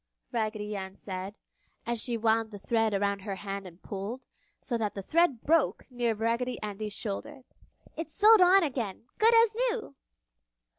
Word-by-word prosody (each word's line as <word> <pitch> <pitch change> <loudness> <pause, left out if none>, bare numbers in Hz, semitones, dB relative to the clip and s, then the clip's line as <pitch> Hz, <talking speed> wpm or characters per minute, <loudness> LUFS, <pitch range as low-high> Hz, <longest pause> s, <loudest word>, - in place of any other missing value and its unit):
Raggedy 215 -3 -2
Ann 190 -1 -5
said, 190 +1 -6 0.5
as 235 -1 -1
she 240 -2 -1
wound 225 0 +2
the 205 - -8
thread 225 +2 +1
around 200 0 0
her 195 0 -5
hand 195 0 -5
and 175 0 -14
pulled, 205 +6 -5 0.3
so 245 - -3
that 215 -3 -1
the 195 - -5
thread 310 - +2
broke 325 -1 +2
near 240 -2 0
Raggedy 235 +3 -1
Andy's 210 0 -4
shoulder. 255 +6 -5 0.5
"It's 325 0 -5
sewed 425 0 +7
on 370 +1 +7
again, 235 - -3
good 455 +2 +6
as 455 -1 +5 0.2
new!" 450 - -4
225 Hz, 160 wpm, -29 LUFS, 205-275 Hz, 0.5 s, sewed